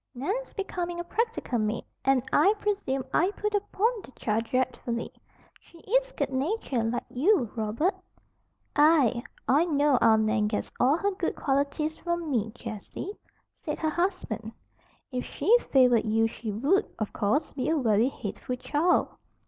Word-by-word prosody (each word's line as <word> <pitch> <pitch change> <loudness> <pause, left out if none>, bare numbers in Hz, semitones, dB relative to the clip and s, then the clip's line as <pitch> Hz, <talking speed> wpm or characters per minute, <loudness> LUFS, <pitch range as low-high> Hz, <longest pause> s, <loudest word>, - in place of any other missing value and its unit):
"Nan 280 +10 -1
is - - -14
becoming 350 -3 -3
a - - -2
practical 445 - -1
maid, 215 +2 -1 0.2
and 270 -2 +3
I 405 +3 +5
presume 390 -12 -1
I 355 +4 +3
put 420 0 -1
upon 410 +1 +1 0.2
the - - -12
child 225 +1 -1
dreadfully, 240 -1 -2 0.5
she 340 - -19
is - - +1
good - - -2
natured, 265 - -1
like 240 - -2
you, 275 - +2
Robert." 230 - 0 0.8
"Aye, 290 -6 +4 0.3
I 290 +6 +4
know 290 -4 +3
our 220 -2 +5
Nan 215 -1 +2
gets 210 - -3
all 270 +5 +4
her 405 +3 0
good 375 -3 -2
qualities 285 +3 -1
from 345 -3 -2
me, 220 -4 0
Jessie," 230 - -7 0.4
said - - -5
her 315 -1 -1
husband. 345 - -2 0.6
"If 250 -1 -2
she 455 - +3 0.2
favored 250 -4 +5
you 225 +1 +2
she 225 -1 -4
would, 275 - +2
of 215 -2 -3
course, 280 +10 0
be 265 - -2
a 320 - +2
very 230 -2 +3
hateful 250 +1 -5
child." 305 +7 +2
275 Hz, 155 wpm, -27 LUFS, 230-350 Hz, 0.8 s, I